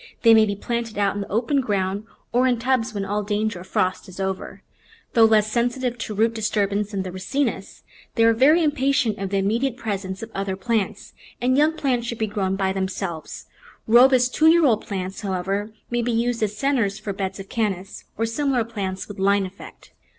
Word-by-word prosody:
They 230 -1 +8
may 220 -1 +6
be 200 - -1
planted 235 +1 -4
out 200 -1 +2
in 205 - -4
the 200 - -6
open 245 +6 +1
ground 200 -3 -1 0.3
or 250 +2 +3
in 245 -2 +2
tubs 230 -2 0
when 200 -2 -3
all 205 +2 -1
danger 210 -1 -1
of 180 - -11
frost 185 +1 -1
is 185 - -11
over. 190 -1 -4 0.5
Though 230 -1 +6
less 215 -1 +3
sensitive 245 +1 -1
to 215 -1 -4
root 225 +2 +2
disturbance 210 -2 0
than 200 -3 -3
the 185 - -6
Ricinus, 190 +11 -3 0.3
they 230 - +3
are 230 0 +6
very 295 +9 +5
impatient 270 -7 +1
of 195 -1 -3
the 200 - 0
immediate 230 +6 0
presence 195 -5 -4
of 225 - -8
other 195 -1 -2
plants, 215 +1 -2 0.3
and 255 +1 +2
young 300 +3 +4
plants 250 -5 0
should 235 - -4
be 220 - 0
grown 200 -3 -1
by 190 -1 0
themselves. 190 -3 -4 0.4
Robust 250 +2 +5
two 315 - +4
year 330 0 +6
old 225 -5 +2
plants, 190 0 -4
however, 195 +1 -2 0.2
may 240 0 +1
be 240 +1 -1
used 235 +1 0
as 210 -1 -1
centres 230 -6 +1
for 210 -2 -5
beds 195 0 -4
of 195 - -8
Cannas 195 -4 -3
or 225 - +1
similar 255 +1 0
plants 195 -5 -5
with 205 -1 -9
line 200 0 +3
effect. 190 +2 -12
215 Hz, 200 wpm, -23 LUFS, 195-240 Hz, 0.5 s, They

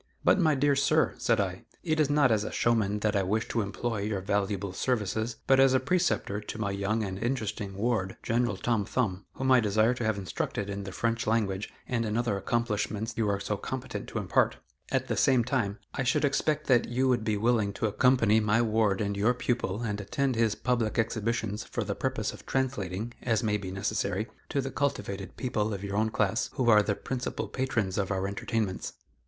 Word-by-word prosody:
"But, - - +4
my 155 -4 +4
dear 140 +1 +3
sir," 155 +3 +3
said 115 -2 +2
I, 95 -2 -2 0.2
"it 155 -2 0
is 150 -2 +3
not 145 -3 +4
as 105 -2 +2
a - - -4
showman 105 -3 +1
that 105 0 +1
I 100 - +3
wish 105 +4 0
to 115 - 0
employ 110 +2 -3
your 105 -1 -1
valuable 100 0 -1
services, 110 0 -1
but 135 0 +5
as 135 -1 +6
a - - +5
preceptor 140 - 0
to 105 - -7
my 105 -3 -1
young 100 +3 -1
and 95 -1 -4
interesting 110 -5 -2
ward, 100 -3 -1
General 120 +1 +1
Tom 115 -4 0
Thumb, 100 -4 -2
whom 130 0 0
I 130 - +7
desire 110 +2 +3
to 120 - -4
have 110 -2 +1
instructed 100 +1 -3
in 100 0 -5
the 95 - -6
French 115 +6 -1
language 105 -3 0 0.2
and 120 -3 0
in 110 0 -1
other 120 -4 +1
accomplishments 110 0 -1
you 110 -2 +1
are 100 0 0
so 100 +1 -2
competent 130 +5 -5
to - - -5
impart. - - +2 0.3
At - - 0
the - - -1
same 130 -3 +4
time, 115 -5 -1 0.2
I - - -2
should 130 +3 +2
expect 150 +2 0
that 120 -3 +3
you 130 +2 +1
would 125 -3 +2
be 110 -1 0
willing 110 -2 +2
to 110 - -2
accompany 110 0 +4
my 105 +1 +2
ward 110 -3 +2
and 100 -1 -1
your 110 +5 +2
pupil 120 -4 -1
and 105 -2 -2
attend 135 +6 -1
his 115 -2 +2
public 120 -3 0
exhibitions 110 -1 -1
for - - -3
the - - -2
purpose - - -2
of - - -13
translating, 120 -5 -2
as 115 -1 +1
may 105 -1 +1
be 95 -2 -6
necessary, 100 +1 -1 0.2
to 140 - 0
the 135 0 -4
cultivated 100 -9 -3
people 110 -4 -1
of 100 - -7
your 100 0 -3
own 110 +1 +2
class 105 -3 0
who 120 -3 +3
are 105 -1 +7
the 105 0 0
principal 125 +3 -4
patrons 110 -7 -1
of 95 - -1
our 95 -1 -1
entertainments." 100 0 -2
110 Hz, 210 wpm, -29 LUFS, 100-125 Hz, 0.3 s, I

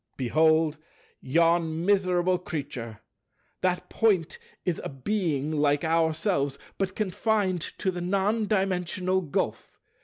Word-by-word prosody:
"Behold 155 +3 +3 0.4
yon 165 +2 +2
miserable 185 -2 +2
creature. 135 -10 -6 0.6
That 180 -1 0
Point 200 -8 +1 0.3
is 175 -3 -1
a - - -4
Being 150 -1 -1
like 145 -1 +2
ourselves, 160 -3 +1 0.2
but 190 -1 -1
confined 205 -2 0 0.2
to 190 - 0
the 175 -1 -5
non 200 +4 +1
dimensional 185 -2 0
Gulf. 150 -6 -3
175 Hz, 110 wpm, -27 LUFS, 155-190 Hz, 0.6 s, Behold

